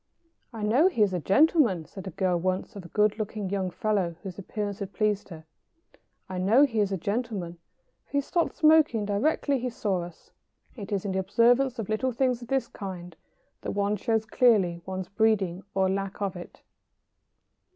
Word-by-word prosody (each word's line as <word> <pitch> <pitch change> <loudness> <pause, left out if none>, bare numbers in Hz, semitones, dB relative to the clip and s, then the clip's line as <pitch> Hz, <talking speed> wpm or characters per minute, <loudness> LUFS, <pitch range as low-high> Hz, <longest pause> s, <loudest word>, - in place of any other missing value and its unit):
"I 225 -3 -6
know 245 - +4
he 275 - +2
is 195 -2 +1
a 180 - 0
gentleman," 230 - +3
said 190 +4 -10
a - - -2
girl 185 +1 0
once 185 +5 -2
of 200 - -7
a - - -10
good 210 +4 +1
looking 210 -2 -4
young 190 -2 -1
fellow 185 -2 -1
whose 190 -1 -7
appearance 205 +1 -4
had 200 -1 -6
pleased 210 -2 0
her 160 -3 -10 0.8
"I 185 -1 -5
know 215 +9 +5
he 230 -6 -2
is 200 -1 +1
a 195 - 0
gentleman, 200 -3 -3 0.5
for - - -30
he 285 - +2
stopped 335 +4 -1
smoking 310 - +4
directly 270 +6 +1
he 250 +1 -2
saw 200 -6 -1
us." 175 -1 -11 0.4
It 205 -5 -8
is 200 -1 -1
in 200 - -1
the 190 - 0
observance 235 +7 +3
of 225 -4 -4
little 235 +4 0
things 250 0 0
of 240 - -9
this 270 +1 0
kind 180 -4 -8 0.5
that - - -4
one 200 +1 +1
shows 220 +1 0
clearly 205 -8 +3
one's 185 -1 -4
breeding 200 -4 +1
or 190 -1 +3
lack 195 +1 -3
of 200 -2 -2
it. 175 - -11
205 Hz, 190 wpm, -27 LUFS, 185-230 Hz, 0.8 s, know